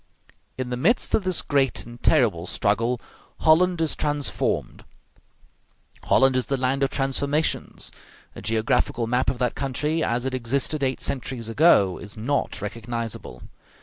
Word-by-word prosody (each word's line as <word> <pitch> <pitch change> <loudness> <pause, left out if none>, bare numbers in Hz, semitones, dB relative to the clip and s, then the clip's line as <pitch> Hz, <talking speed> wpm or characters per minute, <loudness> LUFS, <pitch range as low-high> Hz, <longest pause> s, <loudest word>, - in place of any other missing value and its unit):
In 130 -1 -4
the 125 - -1
midst 230 - +2
of 200 - +2
this 185 -2 0
great 135 -3 +1
and 120 0 -12
terrible 110 - +3
struggle 115 +4 0 0.4
Holland 175 +2 +4
is 160 - +1
transformed: 145 -2 -1 1.2
Holland 135 -1 +4
is 130 - 0
the 135 - 0
land 130 +1 0
of 135 - +2
transformations. 140 +3 -1 0.4
A - - -8
geographical 115 +1 0
map 125 +3 +1
of 130 - -3
that 125 -1 0
country 150 +4 -1
as 120 +2 -1
it 130 - -2
existed 135 +4 -1
eight 130 -1 -1
centuries 130 -4 -3
ago 115 - +4
is 105 +1 -10
not 115 -3 -1
recognizable. 115 +1 -5
130 Hz, 145 wpm, -24 LUFS, 115-145 Hz, 1.2 s, Holland